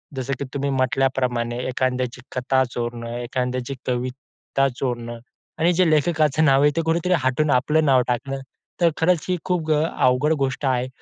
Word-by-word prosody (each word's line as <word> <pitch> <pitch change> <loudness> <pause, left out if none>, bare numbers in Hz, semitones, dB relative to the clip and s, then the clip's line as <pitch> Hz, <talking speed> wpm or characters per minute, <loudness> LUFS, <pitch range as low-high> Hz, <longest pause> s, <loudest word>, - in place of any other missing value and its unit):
जसं 135 +1 -3
की 140 - -3
तुम्ही 140 0 -1
म्हटल्याप्रमाणे 130 -2 0
एखाद्याची 125 -1 -1
कथा 130 +1 +2
चोरणं, 120 -1 -4
एखाद्याची 125 +1 -3
कविता 130 +2 -2
चोरणं 120 -2 -3 0.4
आणि 170 +2 +4
जे 180 -1 +3
लेखकाचं 155 -1 +2
नाव 135 -1 +5
आहे, 145 - +5
ते 165 - +1
कुठेतरी 165 +2 +1
हटून 130 +4 +1
आपलं 150 +5 +2
नाव 130 -3 +5
टाकणं. 135 +3 -2 0.4
तर 170 - +6
खरंच 170 0 +2
ही 180 - +2
खूप 165 -4 -1
अ, 150 0 +2 0.2
अवघड 130 +5 +3
गोष्ट 135 +1 -1
आहे. 130 -1 +1
135 Hz, 160 wpm, -22 LUFS, 125-150 Hz, 0.4 s, तर